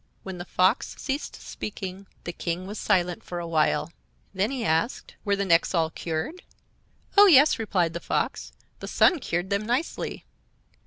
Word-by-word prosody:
When 190 -2 -7
the 175 - -6
Fox 185 +6 +1
ceased 280 +1 -3
speaking 195 -1 -7 0.2
the 175 - -5
King 175 +2 -3
was 205 +2 -6
silent 180 -1 +1
for 175 - -6
a 175 - -3
while. 160 0 +1 0.4
Then 195 +3 +1
he 255 -4 -3
asked: 165 +9 0
"Were 200 -2 +1
the 200 0 -1
necks 170 0 +3
all 160 -1 +2
cured?" 165 - -4 0.7
"Oh, 410 0 +9
yes," 300 -6 +6
replied 180 -7 0
the 170 - -3
fox; - - -2 0.3
"the - - -7
sun 350 - +4
cured 175 -5 -2
them 200 +1 +1
nicely." 245 +9 -2
190 Hz, 165 wpm, -26 LUFS, 170-230 Hz, 0.7 s, Oh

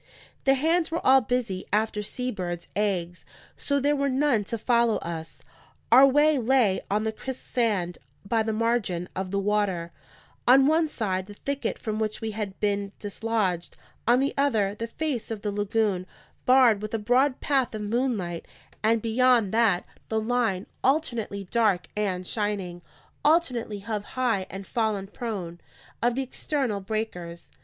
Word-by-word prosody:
The 270 0 +5
hands 325 +4 +2
were 330 +1 -3
all 265 0 +7
busy 230 -5 -2
after 215 0 +1
sea 250 +4 -3
birds' 175 -4 -5
eggs, 180 -4 -1 0.3
so 280 0 0
there 290 +2 +2
were 280 0 0
none 260 -4 +2
to 230 - -3
follow 235 0 +2
us. 165 -1 -7 0.5
Our 260 +3 +9
way 295 +1 +4
lay 240 -5 +3
on 210 +2 +1
the 220 - 0
crisp 260 +4 -7
sand 205 -8 0 0.3
by 225 +2 +2
the 220 0 -1
margin 215 -6 0
of 190 0 -3
the 200 - -1
water: 195 -4 0 0.6
on 265 +2 +7
one 315 +2 +3
side, 190 -9 -2
the 205 - -10
thicket 280 +5 -3
from 215 -2 -3
which 215 -1 -1
we 220 -1 -3
had 205 -2 -5
been 200 -1 -1
dislodged; 205 -4 -2 0.3
on 240 +2 +5
the 275 +1 +1
other, 225 -9 +2
the 230 +2 -5
face 285 -2 -3
of 220 -3 -5
the 205 - -1
lagoon, 205 -2 0 0.4
barred 250 -5 +6
with 215 +1 -3
a - - +1
broad 250 +5 +2
path 265 -5 +1
of 215 - -4
moonlight, 210 -7 -1 0.3
and 220 0 +2
beyond 235 -2 +3
that, 220 -6 +3 0.2
the 220 - +1
line, 220 -4 0 0.2
alternately 240 -8 0
dark 215 -6 +2
and 190 -3 -1
shining, 195 -4 -2 0.4
alternately 255 -9 +2
hove 210 +1 -4
high 230 -7 +1
and 195 +1 -7
fallen 220 -4 -1
prone, 195 -5 -6 0.4
of 240 0 +2
the 270 - 0
external 260 -4 -2
breakers. 190 -5 -5
220 Hz, 160 wpm, -26 LUFS, 200-250 Hz, 0.6 s, Our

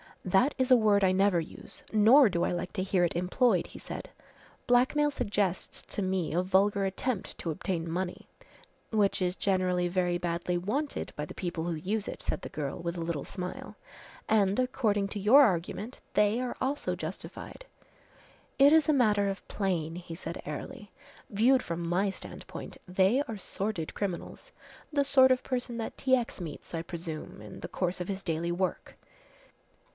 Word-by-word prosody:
"That 190 +10 +3
is 260 -1 +1
a - - +10
word 210 -3 +3
I 185 - +5
never 190 -1 +3
use, 165 - -9
nor 225 +6 +7
do 175 -2 0
I - - +1
like 175 0 -3
to 185 - -1
hear 190 -2 +2
it 170 - +1
employed," 180 +2 +2
he - - -11
said. - - -7 0.6
"Blackmail 280 +4 +3
suggests 200 -7 -1
to - - -1
me 185 -4 -1
a 175 - +2
vulgar 195 +1 +2
attempt 195 +3 -2
to 170 - -3
obtain 165 +1 -3
money." 180 +2 -3 0.6
"Which 210 -3 +2
is 180 0 0
generally 185 -3 +1
very 175 -1 0
badly 175 0 -1
wanted 250 +12 -2
by 150 - -3
the - - -9
people 175 -3 -3
who 175 - -1
use 195 +7 -2
it," - - -6
said - - -2
the - - -7
girl, 145 -3 -4
with 170 +1 -3
a - - -3
little 165 -4 -2
smile, 180 -2 -6 0.5
"and, 205 -1 +3
according 220 -6 +1
to 205 - -4
your 225 +9 +7
argument, 200 +3 -1 0.2
they 210 +2 +3
are 250 -1 -3
also 275 +3 -1
justified." - - -7 0.9
"It 280 +2 +8
is 320 0 +5
a - - +6
matter 210 -6 +3
of 195 - -6
plane," 170 -5 -1
he 175 -2 -7
said 165 -1 -6
airily. 150 +7 -7 0.4
"Viewed 245 +6 +4
from 170 0 -4
my 185 +4 +1
standpoint, - - -8
they 190 +8 +3
are 225 - -5
sordid 195 -3 -3
criminals 190 -4 -5 0.4
the 285 -1 +3
sort 265 -2 +5
of 255 - +2
person 245 -2 -3
that 225 - -5
T. 260 -1 +3
X. 240 -4 -3
meets, 160 -1 -8
I 165 - -1
presume, 165 - -7
in 105 -1 -10
the - - -6
course 180 -1 -2
of 180 - -3
his 195 -1 -4
daily 170 +1 -1
work. 185 +2 -2
190 Hz, 180 wpm, -29 LUFS, 175-225 Hz, 0.9 s, a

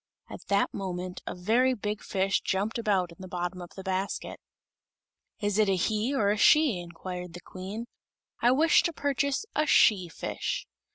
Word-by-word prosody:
At - - -8
that 200 0 +2
moment 185 -2 -4
a - - -4
very 235 +8 +2
big 210 -1 -3
fish 195 0 0
jumped 205 +5 -1
about 195 -6 +1
in 170 - -14
the 190 - -8
bottom 180 0 -4
of 175 - -11
the 190 - -8
basket. 190 +1 -3 1.0
"Is 205 -1 0
it 210 -2 +4
a 195 - +3
he 215 +6 0
or 215 -8 +2
a 210 - 0
she?" 290 - +5
inquired 180 +1 -7
the 175 - -9
Queen. 195 +5 -7 0.6
"I 240 - +5
wish 310 +5 +5
to 340 - -1
purchase 280 - 0
a 305 0 +2
she 200 - +5
fish." - - -3
200 Hz, 175 wpm, -28 LUFS, 185-235 Hz, 1.0 s, she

